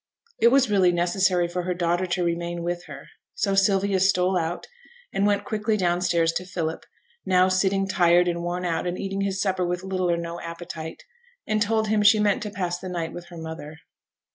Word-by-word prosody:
It - - +5
was 265 +2 +5
really 190 -4 +4
necessary 175 +1 +1
for 175 +1 -3
her 180 0 -2
daughter 175 +1 0
to 180 0 -1
remain 170 0 -2
with 175 0 -3
her; - - -10 0.3
so 195 - 0
Sylvia 195 0 +2
stole 185 0 +2
out, 170 0 -2 0.5
and 200 - +2
went 205 -1 +1
quickly 215 0 -1
down 175 -2 +1
stairs 170 -2 +2
to 175 - -3
Philip 170 -3 -4 0.4
now 185 0 +3
sitting 195 +1 +1
tired 175 -1 +4
and 170 -1 -1
worn 175 +1 -3
out, 170 0 -1
and 175 +1 -2
eating 195 0 -3
his 195 -1 -1
supper 190 -2 0
with 180 +1 -2
little 185 -1 -1
or 170 - +2
no 170 0 -5
appetite 170 -1 -7 0.4
and 215 0 0
told 220 0 +1
him 215 -1 +2
she 205 +1 +6
meant 205 -2 +2
to 210 - -4
pass 180 -3 -3
the 185 - -7
night 170 -2 -4
with 175 - -8
her 175 - -11
mother. 160 -1 -8
180 Hz, 205 wpm, -24 LUFS, 175-195 Hz, 0.5 s, she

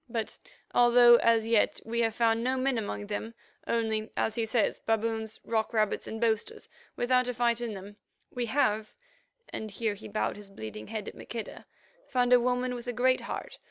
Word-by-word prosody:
But 225 -1 -3 0.3
although, 240 0 +7
as 230 -1 +3
yet, 225 -2 +2
we 230 +1 -2
have 225 -2 +1
found 230 -1 +2
no 260 +1 +1
men 260 -2 +1
among 205 -1 -4
them, 215 +2 -5 0.3
only, 220 -1 0
as 220 - +1
he 225 0 -1
says, 225 -1 +1
baboons, 225 0 -1
rock 220 0 -1
rabbits, 215 -2 +1
and 220 - -5
boasters 230 - -1 0.3
without 250 +1 +2
a 250 - -2
fight 235 0 +1
in 230 -3 -3
them, 200 +2 -10 0.3
we 245 -1 -2
have"—and 280 - -3
here 215 +1 -1
he 205 - -10
bowed 210 0 -2
his 205 -1 -12
bleeding 110 - -8
head 215 -2 -4
to - - -8
Maqueda—"found 250 - -3
a 250 - +8
woman 250 +1 0
with 245 0 -7
a 245 - -2
great 255 +2 +2
heart. - - -6
230 Hz, 180 wpm, -29 LUFS, 220-245 Hz, 0.3 s, a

